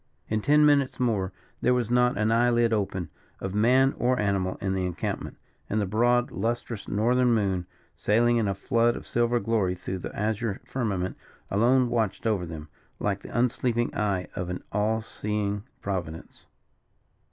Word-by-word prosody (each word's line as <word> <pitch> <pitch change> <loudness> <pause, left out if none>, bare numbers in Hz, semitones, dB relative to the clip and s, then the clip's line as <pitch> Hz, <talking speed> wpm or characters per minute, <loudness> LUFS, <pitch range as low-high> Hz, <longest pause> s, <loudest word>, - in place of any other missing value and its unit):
In 110 0 0
ten 150 +5 +5
minutes 140 -3 +3
more 105 -7 0 0.3
there 125 +1 +3
was 120 -2 -1
not 125 -2 +3
an 110 +2 +2
eyelid 120 0 +3
open, 95 -6 -2 0.3
of 95 - -4
man 130 +6 +4
or 125 +1 +2
animal, 100 -3 0
in 95 -1 -1
the 95 -1 -1
encampment; 90 -2 -4 0.3
and 110 - 0
the 105 - +1
broad, 120 +5 +2
lustrous, 115 -2 -3
Northern 120 +3 +2
moon, 95 -4 0 0.3
sailing 120 +3 +3
in 110 -3 +1
a 100 - -1
flood 120 +2 +2
of - - -8
silver 120 0 +1
glory 105 -4 0
through 95 +1 -5
the - - -7
azure 110 0 -1
firmament, 100 -8 -2 0.3
alone 125 +5 +4
watched 115 -4 -1
over 100 -6 0
them, 80 -2 -7 0.3
like 100 -1 -1
the - - -11
unsleeping 120 -1 +1
eye 100 -4 0
of 90 -1 -3
an 90 - -4
all 110 +2 +1
seeing 105 -1 -3 0.2
Providence. 85 -5 -5
110 Hz, 165 wpm, -27 LUFS, 100-120 Hz, 0.3 s, ten